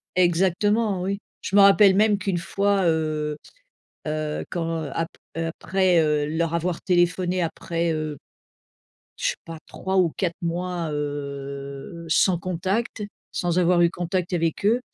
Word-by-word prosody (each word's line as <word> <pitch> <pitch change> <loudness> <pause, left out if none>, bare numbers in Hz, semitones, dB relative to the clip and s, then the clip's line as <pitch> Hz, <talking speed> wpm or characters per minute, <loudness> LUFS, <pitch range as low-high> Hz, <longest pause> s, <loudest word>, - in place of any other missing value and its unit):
et 185 - +5
exactement 190 +3 +2
oui. 200 +2 -2 0.2
Je 200 - 0
me - - +9
rappelle 200 0 +7
même 210 0 +4
qu'une 195 -3 -1
fois, 200 +2 +1
heu 155 -2 0 0.7
heu, 155 0 -2
quand 165 -2 -2
ap 165 0 -1 0.3
après, 175 +2 +1
heu, 150 -1 +1
leur 165 +1 -1
avoir 170 +1 -1
téléphoné 180 0 +1
après, 165 0 -1
heu, 155 -2 -3 1.0
je - - -4
sais - - -2
pas 165 -1 -7
3 190 0 -3
ou 175 -4 +4
4 185 - 0
mois, 170 -1 -2
heu, 140 +1 -5
sans 175 +2 +3
contact, 185 +6 -2 0.3
sans 175 0 -1
avoir 175 0 +4
eu 170 - +5
contact 180 +1 -2
avec 165 +3 0
eux, 235 +3 +4
175 Hz, 145 wpm, -24 LUFS, 160-190 Hz, 1.0 s, me